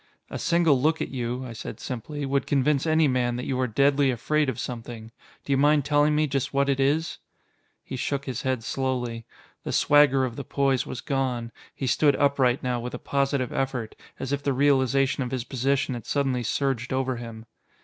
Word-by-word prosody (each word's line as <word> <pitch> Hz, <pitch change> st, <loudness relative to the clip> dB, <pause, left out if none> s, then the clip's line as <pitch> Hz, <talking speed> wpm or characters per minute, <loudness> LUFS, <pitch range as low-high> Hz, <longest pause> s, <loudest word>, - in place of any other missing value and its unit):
"A -, -, -4 dB
single 165 Hz, -6 st, +3 dB
look 160 Hz, +3 st, +2 dB
at -, -, -3 dB
you," 125 Hz, 0 st, -3 dB
I 120 Hz, -, -7 dB
said 115 Hz, -, -7 dB
simply, 140 Hz, +3 st, -5 dB
"would 135 Hz, 0 st, 0 dB
convince 140 Hz, +2 st, +1 dB
any 160 Hz, -1 st, +4 dB
man 125 Hz, -2 st, 0 dB
that 125 Hz, -, -4 dB
you 130 Hz, -1 st, -2 dB
are 130 Hz, -, +1 dB
deadly 140 Hz, +4 st, +3 dB
afraid 145 Hz, +4 st, 0 dB
of 125 Hz, -, -3 dB
something. 115 Hz, -2 st, -6 dB, 0.3 s
Do 140 Hz, -, 0 dB
you -, -, +3 dB
mind 145 Hz, 0 st, +3 dB
telling 145 Hz, +1 st, +3 dB
me 155 Hz, +1 st, +3 dB
just 140 Hz, -1 st, -2 dB
what 140 Hz, 0 st, +2 dB
it 135 Hz, -1 st, +1 dB
is?" 150 Hz, +5 st, +1 dB, 0.6 s
He -, -, -6 dB
shook 140 Hz, +2 st, -2 dB
his 125 Hz, -3 st, -4 dB
head 130 Hz, -3 st, -1 dB
slowly. 125 Hz, -3 st, -3 dB, 0.4 s
The -, -, -4 dB
swagger 140 Hz, -2 st, +4 dB
of 120 Hz, -2 st, -6 dB
the 140 Hz, -, -4 dB
poise 135 Hz, -2 st, 0 dB
was 130 Hz, -, -5 dB
gone; 125 Hz, -4 st, -2 dB, 0.2 s
he 135 Hz, -, -4 dB
stood 145 Hz, +3 st, +3 dB
upright 140 Hz, -3 st, +2 dB
now 125 Hz, -1 st, -1 dB
with 125 Hz, +1 st, -5 dB
a -, -, -4 dB
positive 140 Hz, -1 st, -1 dB
effort, 130 Hz, -5 st, -2 dB, 0.2 s
as 135 Hz, +1 st, -4 dB
if 140 Hz, -, -1 dB
the 140 Hz, -1 st, 0 dB
realization 135 Hz, 0 st, +2 dB
of 125 Hz, -, -2 dB
his 130 Hz, -2 st, -3 dB
position 135 Hz, +2 st, 0 dB
had 120 Hz, -2 st, -7 dB
suddenly 135 Hz, -3 st, 0 dB
surged 125 Hz, 0 st, -1 dB
over 130 Hz, -1 st, -1 dB
him. 115 Hz, -1 st, -8 dB
135 Hz, 200 wpm, -25 LUFS, 125-140 Hz, 0.6 s, any